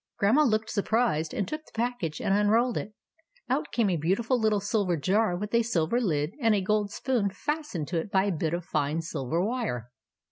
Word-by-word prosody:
Grandma 225 Hz, +9 st, +4 dB
looked 220 Hz, -5 st, +1 dB
surprised, 205 Hz, -7 st, +1 dB
and 200 Hz, -, -2 dB
took 305 Hz, +1 st, -5 dB
the -, -, -21 dB
package 230 Hz, -10 st, -2 dB
and 195 Hz, -, +1 dB
unrolled 220 Hz, +4 st, +3 dB
it. 210 Hz, -, -4 dB, 0.6 s
Out -, -, 0 dB
came 230 Hz, -3 st, +2 dB
a 175 Hz, -, +1 dB
beau 165 Hz, +5 st, +1 dB
tiful 235 Hz, +3 st, 0 dB
little 215 Hz, -2 st, +2 dB
silver 200 Hz, -3 st, 0 dB
jar 190 Hz, +4 st, +1 dB
with 210 Hz, +3 st, -5 dB
a 235 Hz, -, +5 dB
silver 225 Hz, 0 st, 0 dB
lid, 155 Hz, -7 st, 0 dB
and 225 Hz, -2 st, +4 dB
a -, -, +2 dB
I -, -, 0 dB
gold 205 Hz, +1 st, 0 dB
spoon 235 Hz, -4 st, 0 dB
fastened 265 Hz, -, -3 dB
to 170 Hz, -1 st, 0 dB
it 165 Hz, -, -5 dB
by 190 Hz, -2 st, +3 dB
a 200 Hz, -, 0 dB
bit 165 Hz, -1 st, -1 dB
of 175 Hz, -1 st, -5 dB
fine 145 Hz, 0 st, -1 dB
I -, -, 0 dB
silver 160 Hz, -1 st, -2 dB
wire. 210 Hz, -, -3 dB
205 Hz, 220 wpm, -28 LUFS, 170-230 Hz, 0.6 s, a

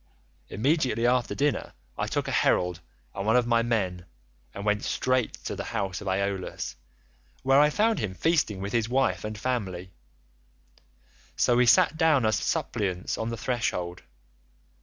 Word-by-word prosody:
Immediately 125 Hz, -, +1 dB
after 125 Hz, 0 st, +1 dB
dinner 145 Hz, +1 st, -1 dB, 0.2 s
I -, -, -2 dB
took -, -, -2 dB
a -, -, -2 dB
herald 90 Hz, -1 st, +2 dB, 0.3 s
and 100 Hz, -, -4 dB
one 110 Hz, +4 st, +2 dB
of 125 Hz, -1 st, +4 dB
my 115 Hz, -1 st, +3 dB
men 95 Hz, -7 st, -1 dB, 0.4 s
and 100 Hz, -, -7 dB
went 105 Hz, 0 st, +1 dB
straight 130 Hz, -2 st, 0 dB
to -, -, -3 dB
the -, -, -5 dB
house 95 Hz, -2 st, -2 dB
of 100 Hz, -, -8 dB
Aeolus, 95 Hz, 0 st, -2 dB, 0.7 s
where 135 Hz, +1 st, +5 dB
I 150 Hz, +1 st, +6 dB
found 220 Hz, +8 st, +1 dB
him 100 Hz, -4 st, -3 dB
feasting 150 Hz, -, +1 dB
with 100 Hz, +1 st, -4 dB
his 115 Hz, -1 st, +1 dB
wife 130 Hz, +1 st, +1 dB
and 105 Hz, 0 st, -5 dB
family; 95 Hz, -7 st, -3 dB, 1.4 s
so 120 Hz, -, +3 dB
we 125 Hz, 0 st, +4 dB
sat 170 Hz, +4 st, +5 dB
down 155 Hz, -7 st, +3 dB
as 110 Hz, -1 st, +2 dB
suppliants 90 Hz, -3 st, -2 dB
on 110 Hz, -, -3 dB
the 115 Hz, -, -4 dB
threshold. 90 Hz, -8 st, -2 dB
115 Hz, 160 wpm, -27 LUFS, 100-130 Hz, 1.4 s, I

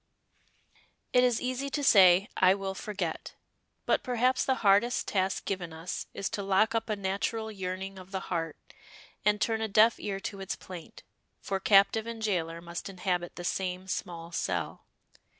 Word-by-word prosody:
It 250 Hz, -, +6 dB
is 245 Hz, -2 st, +3 dB
easy 255 Hz, +2 st, -2 dB
to 290 Hz, +1 st, -2 dB
say, 190 Hz, -5 st, +7 dB
"I 185 Hz, +1 st, +5 dB
will 195 Hz, -1 st, -4 dB
forget," 190 Hz, -4 st, -4 dB, 0.5 s
but -, -, +2 dB
perhaps 250 Hz, +1 st, +1 dB
the 265 Hz, -, +1 dB
hardest 205 Hz, +5 st, +4 dB
task 190 Hz, -1 st, 0 dB
given 180 Hz, -4 st, -3 dB
us 165 Hz, +3 st, -5 dB
is 195 Hz, -, -3 dB
to 205 Hz, -, -3 dB
lock 200 Hz, +3 st, +2 dB
up 225 Hz, 0 st, -1 dB
a 215 Hz, -, +1 dB
natural 205 Hz, +3 st, -2 dB
yearning 190 Hz, -1 st, -5 dB
of 185 Hz, 0 st, -12 dB
the 190 Hz, -1 st, -3 dB
heart, 165 Hz, -2 st, -3 dB, 0.7 s
and 210 Hz, 0 st, +3 dB
turn 220 Hz, +1 st, 0 dB
a 220 Hz, -, 0 dB
deaf 220 Hz, +3 st, +4 dB
ear 195 Hz, -1 st, -3 dB
to 195 Hz, -, -5 dB
its 195 Hz, -1 st, -3 dB
plaint, 180 Hz, -3 st, -11 dB, 0.4 s
for 195 Hz, -1 st, -2 dB
captive 200 Hz, +3 st, +4 dB
and 230 Hz, -1 st, -5 dB
jailer 170 Hz, -5 st, -1 dB
must 170 Hz, +2 st, -6 dB
inhabit 180 Hz, -2 st, -2 dB
the 175 Hz, -, -7 dB
same 185 Hz, 0 st, -2 dB
small 170 Hz, -2 st, -5 dB
cell. 90 Hz, -, -3 dB
195 Hz, 170 wpm, -29 LUFS, 180-220 Hz, 0.7 s, say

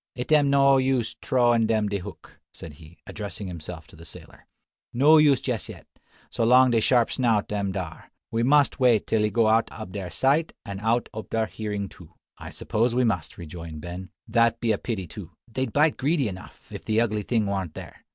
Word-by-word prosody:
"It 125 Hz, +4 st, -5 dB
am 145 Hz, -2 st, +5 dB
no 140 Hz, -1 st, +5 dB
use 130 Hz, -3 st, 0 dB
trowin' 120 Hz, -3 st, +2 dB
dem 110 Hz, -2 st, +1 dB
de 100 Hz, 0 st, -2 dB
hook," 90 Hz, -, -12 dB
said 80 Hz, -, -11 dB
he, 80 Hz, +2 st, -15 dB
addressing 100 Hz, -1 st, -7 dB
himself 85 Hz, -2 st, -8 dB
to -, -, -18 dB
the 80 Hz, -, -14 dB
sailor, 80 Hz, -, -14 dB, 0.4 s
"no 145 Hz, +6 st, +5 dB
use 145 Hz, -3 st, +4 dB
jess 120 Hz, -6 st, -3 dB
yet, -, -, -11 dB, 0.5 s
so -, -, -1 dB
long 125 Hz, +2 st, +5 dB
de 115 Hz, -1 st, +2 dB
sharp 120 Hz, 0 st, +3 dB
snout 115 Hz, -6 st, 0 dB
am 100 Hz, -2 st, -1 dB
dar. 90 Hz, -4 st, -7 dB, 0.2 s
We 115 Hz, -, 0 dB
mus' 145 Hz, +3 st, +4 dB
wait 120 Hz, -5 st, +3 dB
till 110 Hz, -, +1 dB
he 105 Hz, -, +2 dB
go 115 Hz, 0 st, +2 dB
out 110 Hz, +1 st, +2 dB
ob 110 Hz, -4 st, -8 dB
dar 95 Hz, -3 st, -5 dB
sight 140 Hz, -, +1 dB
an 100 Hz, -1 st, -6 dB
out 115 Hz, +3 st, 0 dB
ob 110 Hz, -, -7 dB
dar 110 Hz, -1 st, 0 dB
hearin 105 Hz, -2 st, -4 dB
too." 90 Hz, -3 st, -16 dB, 0.2 s
"I -, -, -8 dB
suppose 115 Hz, +2 st, -1 dB
we 125 Hz, -, +3 dB
must," 90 Hz, -9 st, -1 dB
rejoined 80 Hz, -2 st, -8 dB
Ben; 90 Hz, +2 st, -7 dB, 0.2 s
"that 115 Hz, 0 st, +2 dB
be 115 Hz, -2 st, 0 dB
a 105 Hz, -, 0 dB
pity 105 Hz, -6 st, -4 dB
too. 80 Hz, -, -10 dB
They'd 130 Hz, +1 st, -3 dB
bite 150 Hz, +4 st, +2 dB
greedy 140 Hz, 0 st, +1 dB
enough, 95 Hz, -2 st, -10 dB
if -, -, -8 dB
the 110 Hz, 0 st, +1 dB
ugly 110 Hz, -2 st, 0 dB
thing 110 Hz, +1 st, 0 dB
warn't 95 Hz, -5 st, -3 dB
there. -, -, -11 dB
110 Hz, 210 wpm, -25 LUFS, 95-125 Hz, 0.5 s, am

